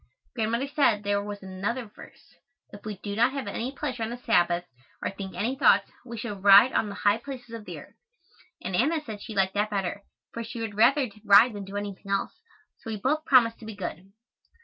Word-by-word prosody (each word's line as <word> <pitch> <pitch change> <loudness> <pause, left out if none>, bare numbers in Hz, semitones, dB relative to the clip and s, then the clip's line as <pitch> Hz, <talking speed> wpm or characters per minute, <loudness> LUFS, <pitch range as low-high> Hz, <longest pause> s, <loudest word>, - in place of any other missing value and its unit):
Grandmother 230 +3 -1
said 255 -8 +2
there 200 0 0
was 205 -1 -7
another 195 +7 -3
verse, 205 - -16 0.4
"If 205 0 -12
we 210 -2 -5
do 200 -1 -4
not 240 +4 +3
have 275 -3 -4
any 235 +5 -3
pleasure 270 -4 -4
on 225 - -1
the 240 - -5
Sabbath, 175 -7 +2 0.4
or - - -3
think 195 -1 -8
any 240 +6 -1
thoughts, 200 -6 +4
we 235 -2 -8
shall 215 -2 -5
ride 200 +5 +8
on 210 - +1
the 200 - -7
high 205 +2 +2
places 245 -2 -9
of 225 -2 -7
the - - -7
earth," - - -16 0.7
and 185 - -2
Anna 305 - +1
said 210 -2 -7
she 220 -1 -8
liked 190 -1 +2
that 210 +1 0
better, 200 -1 -2 0.3
for 230 - -4
she 230 +1 -7
would 225 -2 -4
rather 245 +3 +3
ride 215 +3 +7
than 200 -1 -6
do 195 +1 -6
anything 200 -1 -6
else, 195 - 0 0.5
so - - -9
we 220 - -3
both 300 +9 0
promised 235 -4 +4
to 225 - -11
be 220 - -7
good. 190 0 -7
215 Hz, 215 wpm, -27 LUFS, 200-240 Hz, 0.7 s, ride